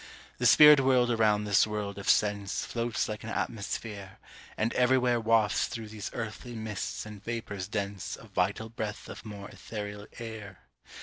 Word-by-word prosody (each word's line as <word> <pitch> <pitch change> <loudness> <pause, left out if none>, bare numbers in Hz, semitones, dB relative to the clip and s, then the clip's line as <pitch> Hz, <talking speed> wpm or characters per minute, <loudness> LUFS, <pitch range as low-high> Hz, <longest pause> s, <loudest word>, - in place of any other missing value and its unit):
The - - +4
spirit 150 -1 +9
world 130 -2 +3
around 110 -2 +3
this 105 0 +4
world 105 -2 -4
of 100 - -3
sense 100 -2 +2
Floats 115 -1 -1
like 105 0 -5
an 110 - -6
atmosphere, 100 -3 -4 0.4
and 110 +2 0
everywhere 125 -1 +3
Wafts 110 -2 +2
through 110 -2 -6
these 105 -1 -6
earthly 115 +1 -6
mists 110 -2 -4
and 105 -2 -10
vapors 110 -5 -4
dense 100 -2 -4
A - - -13
vital 100 +2 -1
breath 110 -2 -5
of - - -9
more 105 -3 -8
ethereal 105 -1 -7
air. 110 -5 -8
110 Hz, 160 wpm, -29 LUFS, 100-115 Hz, 0.4 s, spirit